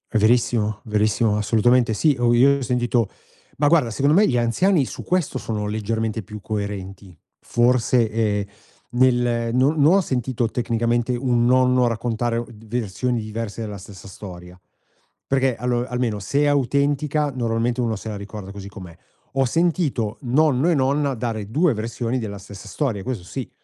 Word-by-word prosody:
È - - +3
verissimo, 110 -1 +2
verissimo, 105 0 +1
assolutamente 115 +2 +3
sì. 145 +5 +2
O 120 -1 +3
io 135 +4 +5
ho - - -6
sentito 120 -3 0 0.5
ma 145 - +3
guarda 150 -8 +3
secondo 140 +7 +2
me 210 - +5
gli 125 - +1
anziani 140 - +2
su - - -8
questo 180 -7 -1
sono 105 -4 -3
leggermente 110 +1 -2
più 105 +1 -10
coerenti. 100 -3 -5 0.2
Forse, 120 -1 +2
ehm, 105 -2 0 0.5
nel 120 -2 +2
non 135 +5 +3
non 150 +4 +6
ho 195 - +5
sentito 125 -6 -1
tecnicamente 120 +1 0
un 120 -1 +1
nonno 125 0 +4
raccontare 115 0 -1
o 120 - -2
d 110 0 -15
versioni 120 +2 -2
diverse 110 0 -5
della 105 -2 -5
stessa 100 0 -12
storia, 90 -2 -10 0.7
perché 135 -2 +1
allo 120 +1 -1
almeno 125 -4 -2
se 140 +9 0
è - - +3
autentica 145 +2 +1
normalmente 120 0 -1
uno 115 -3 0
se 110 +2 -7
la 105 - -4
ricorda 100 -1 -8
così 100 0 -9
com'è. 95 -4 -10 0.4
Ho 135 0 +3
sentito 150 - 0
nonno 140 +3 +2
e 170 - +3
nonna 140 +1 +1
dare 110 -3 -4
2 155 +7 +2
versioni 115 +3 -3
della 105 -3 -5
stessa 100 +1 -11
storia, 115 -4 -2
questo 115 -3 -4
sì. 125 +8 -6
120 Hz, 165 wpm, -22 LUFS, 105-130 Hz, 0.7 s, non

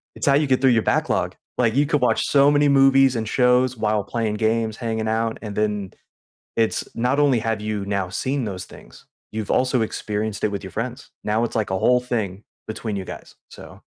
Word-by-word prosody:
It's - - -4
how 140 - +5
you 145 +1 +3
get 130 -1 +2
through 135 - +4
your 115 -3 +3
backlog. - - 0 0.2
Like, 115 -2 +2
you 145 +2 +3
could 150 0 +1
watch 125 - +2
so 140 0 +4
many 145 0 +3
movies, 135 -1 +5
and 110 -1 -2
shows 125 0 +3
while 105 -2 0
playing 110 -3 -2
games, 110 0 0
hanging 110 -2 -2
out, 110 0 -1
and 105 -2 -6
then, 105 -2 -1 0.7
it's 115 -1 0
not 125 +5 +1
only 135 -5 +4
have 110 -1 -2
you 105 -2 -3
now 100 -2 -1
seen 130 +7 -2
those 95 -4 -5
things, - - -16 0.2
you've 110 -1 -5
also 130 -1 +2
experienced 105 -1 -3
it 105 - +1
with 100 -1 -5
your 95 - -8
friends. 125 +4 -5
Now, 110 +2 0
it's 120 - -4
like 110 -4 -1
a 95 - 0
whole 125 +4 +3
thing 110 -6 -3 0.2
between 110 -1 -4
you 95 - -4
guys, - - -10
so - - -13
115 Hz, 210 wpm, -22 LUFS, 105-130 Hz, 0.7 s, how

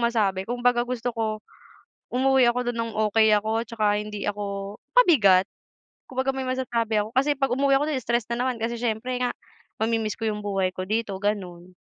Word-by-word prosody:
masabi. 210 -5 +1
Kung 245 0 -3
baga 245 -1 +4
gusto 245 -1 -2
ko 220 -2 -2 0.7
umuwi 265 0 +4
ako 245 0 0
do'n 235 - -7
ng 230 0 -2 0.2
okey 220 -1 +5
ako 220 +2 0
at - - -34
saka 220 -2 0
hindi 210 -1 -6
ako 200 0 -4 0.2
pabigat. 215 - +6 0.7
Kumbaga 260 +1 0
may 265 - -3
masasabi 235 -4 -1
ako. 215 - -7
Kasi 285 +2 +3
'pag 270 -1 +1
umuwi 275 +1 +3
ako 290 - 0
do'n 280 - 0
stress 235 -1 0
na 235 +1 -1
naman 255 -1 -1
kasi 235 +1 -1
siyempre 235 +1 -2
nga 245 - +1 0.5
mami-miss 220 -2 0
ko 225 - -2
yung 210 -1 -4
buhay 195 -2 0
ko 185 - -3
dito, 215 -2 -1
gano'n. 185 -3 -3
225 Hz, 190 wpm, -25 LUFS, 210-250 Hz, 0.7 s, pabigat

